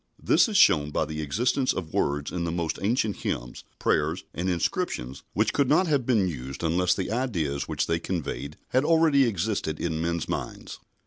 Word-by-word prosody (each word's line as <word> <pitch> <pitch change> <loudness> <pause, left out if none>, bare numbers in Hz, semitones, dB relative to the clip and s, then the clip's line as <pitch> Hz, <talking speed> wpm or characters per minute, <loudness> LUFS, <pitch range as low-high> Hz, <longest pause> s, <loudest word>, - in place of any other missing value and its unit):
This - - +4
is 210 - +1
shown 75 - +5
by 75 - 0
the 80 +1 -5
existence 125 - +1
of 85 -4 -6
words 75 +1 0
in 90 -1 -2
the 85 - -1
most 85 -1 -2
ancient 110 0 0
hymns, - - -4
prayers, 80 +5 0
and 90 +2 -2
inscriptions 70 -7 -2
which - - +1
could 140 -2 +2
not 160 +6 +4
have 145 -7 0
been 110 -7 +3
used 65 -3 -6
unless 90 +2 +2
the 95 - -3
ideas 85 - -1
which - - -1
they 85 0 0
conveyed 75 -5 -4
had 130 +2 +2
already 160 -4 +4
existed 100 -7 -1
in 80 -2 -2
men's 85 0 -1
minds. - - -5
85 Hz, 185 wpm, -26 LUFS, 75-120 Hz, -, shown